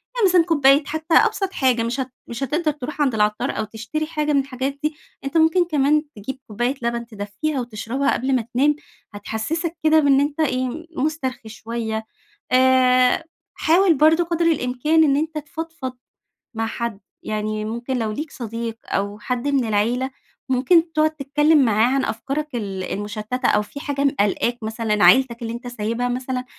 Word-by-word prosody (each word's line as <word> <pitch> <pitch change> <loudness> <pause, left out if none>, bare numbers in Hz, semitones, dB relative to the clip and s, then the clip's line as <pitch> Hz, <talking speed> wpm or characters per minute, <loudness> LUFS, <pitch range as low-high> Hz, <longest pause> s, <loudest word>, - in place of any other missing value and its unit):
يعني 460 -5 +4
مثلًا 355 -1 +5
كوباية 285 -3 +4
حتى 315 +2 -3
أبسط 390 -1 +3
حاجة 250 -4 +2
مش 235 +4 -2
هت 260 -1 -3 0.2
مش 235 +2 -5
هتقدر 305 +4 0
تروح 295 +1 -6
عند 275 -4 +2
العطّار 210 0 +1
أو - - 0
تشتري 230 +9 -4
حاجة 300 -2 -1
من 280 - +4
الحاجات 270 +1 -3
دي، 305 0 0 0.3
أنت 275 +4 -1
ممكن 325 +3 +4
كمان 300 -1 +2
تجيب 240 +6 -6
كوباية 240 +5 -1
لبن 235 0 -2
تدفّّيها 220 +6 -4
وتشربها 240 +4 -1
قبل 260 +1 0
ما 250 - +2
تنام، 290 +4 +3 0.4
هتحسِّسك 260 - -3
كده 315 0 +5
بإنِ 280 -2 +4
أنت 290 +2 -1
إيه 260 +2 -1
مُسترخي 260 -7 -2
شوية، 220 +1 -4 0.5
آآ 255 +1 +4 0.3
حاول 345 +2 +4
برضه 315 +4 +4
قدر 340 0 -1
الإمكان 300 +1 +2
إن 280 -2 +3
أنت 310 +1 -2
تفضفض 305 -2 -6 0.6
مع 225 0 -1
حد، 225 -2 -4 0.2
يعني 215 0 -3
ممكن 235 +4 -3
لو 220 -1 -1
ليك 300 +6 -5
صديق 230 -1 -5
أو 200 +1 -2
حد 250 +5 -3
من 275 -3 +2
العيلة، 235 +5 0 0.4
ممكن 325 +6 +3
تقعد 310 0 +3
تتكلم 295 0 +3
معاه 225 +3 +3
عن 270 - +1
أفكارك 275 +5 -3
ال 195 -5 -4
المشتتة 210 +6 -3
أو 210 - +3
في 210 +7 -9
حاجة 285 -1 -2
م 280 - +5
قالقاك، 210 +4 +1
مثلًا 220 -1 0
عيلتك 255 -2 +5
اللي 230 0 -4
أنت 240 +1 -7
سايبها 230 +1 -2
مثلًا، 255 0 -3
260 Hz, 170 wpm, -22 LUFS, 230-300 Hz, 0.6 s, مثلًا